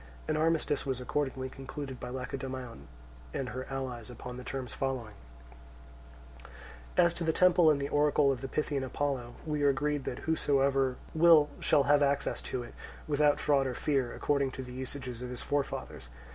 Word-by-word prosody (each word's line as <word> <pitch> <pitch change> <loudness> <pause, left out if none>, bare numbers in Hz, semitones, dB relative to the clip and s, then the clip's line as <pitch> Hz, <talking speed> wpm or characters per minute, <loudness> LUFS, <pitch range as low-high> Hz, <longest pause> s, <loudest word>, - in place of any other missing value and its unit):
An 155 - +1
armistice 155 -2 +1
was 130 -3 -2
accordingly 130 0 -2
concluded 135 0 -7
by 125 - -6
Lacedaemon 130 - -6 0.5
and 130 -2 -2
her 130 +1 -5
allies 130 -4 -4
upon 125 +1 -8
the 125 - -7
terms 130 -1 -5
following: 130 -5 -3 1.3
1. - - -14 0.6
As 170 - +2
to 170 - -4
the 160 - +2
temple 175 -1 +5
and 140 -2 +2
oracle 145 -1 +3
of 130 -2 -3
the 135 - -4
Pythian 145 -1 -1
Apollo, 130 -2 -2
we 150 -2 -1
are 145 - +5
agreed 145 +1 0
that 125 - -3
whosoever 135 -4 +2 0.2
will 160 -2 +6
shall 140 - +4
have 145 +1 +4
access 140 0 +1
to 125 - -3
it, 120 - -11 0.3
without 150 -1 +3
fraud 140 -2 +2
or 125 - -3
fear, 135 -4 0
according 140 -2 +1
to 130 - -5
the 125 -1 -9
usages 125 -1 -5
of 125 - -5
his 125 -1 -5
forefathers. 140 - -3
135 Hz, 175 wpm, -31 LUFS, 130-145 Hz, 1.3 s, will